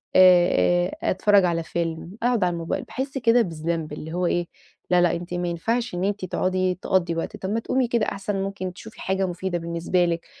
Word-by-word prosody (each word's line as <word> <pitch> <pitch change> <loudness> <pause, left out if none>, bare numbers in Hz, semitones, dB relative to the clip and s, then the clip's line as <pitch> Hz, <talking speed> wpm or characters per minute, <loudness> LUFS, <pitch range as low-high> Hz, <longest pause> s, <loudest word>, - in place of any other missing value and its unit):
آآ 175 -1 +5 0.2
آآ - - +1
أتفرّج 200 0 +4
على 165 -1 0
فيلم 165 +3 -4
أقعد 240 -4 +2
على 175 - 0
الموبايل 170 -1 -3
باحس 270 +1 -4
كده 240 -1 +4
بالذنب. 165 -4 -3
اللي 155 +2 -7
هو 180 +1 0
إيه؟ 175 0 0 0.4
لا 180 -1 +4
لأ 175 -1 +3
أنتِ 175 +1 -6
ما 175 0 -1
ينفعش 225 +6 -1
إن 175 - -2
أنتِ 200 -1 -1
تقعدي 185 0 0
تقضي 175 -3 +1
وقت، 165 - -4
طَب 190 - -5
ما 225 - +1
تقومي 255 +2 0
كده 235 -2 +1
أحسن 200 +1 -3
ممكن 190 -2 -4
تشوفي 220 +4 -12
حاجة 190 0 0
مفيدة 180 0 -3
بالنسبة 170 +1 0
لِك، 170 -1 -2
180 Hz, 200 wpm, -24 LUFS, 170-200 Hz, 0.4 s, آآ